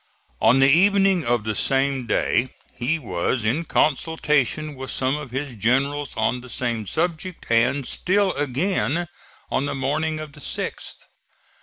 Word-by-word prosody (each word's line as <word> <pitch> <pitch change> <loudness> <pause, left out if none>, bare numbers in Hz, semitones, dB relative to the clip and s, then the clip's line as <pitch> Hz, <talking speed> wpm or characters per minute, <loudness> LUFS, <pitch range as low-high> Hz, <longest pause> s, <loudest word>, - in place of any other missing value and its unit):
On 115 +4 +5
the 135 0 +6
evening 195 +3 +4
of 120 -2 +1
the 110 0 -2
same 135 +1 +1
day 125 +2 +1 0.2
he 130 +7 -1
was 110 - -2
in 140 +10 0
consultation 150 -1 +1
with 130 -1 -7
some 130 +1 0
of 150 -3 -6
his 135 +2 -4
generals 135 +6 0
on 125 - 0
the 125 - -12
same 115 -4 -2
subject, 170 - -2
and 120 +4 +2
still 195 +1 +1
again 155 +4 -1 0.4
on 140 - 0
the - - -3
morning 155 +4 -1
of 155 -1 -7
the 150 - -14
6th. - - -5
140 Hz, 150 wpm, -23 LUFS, 125-155 Hz, 0.4 s, the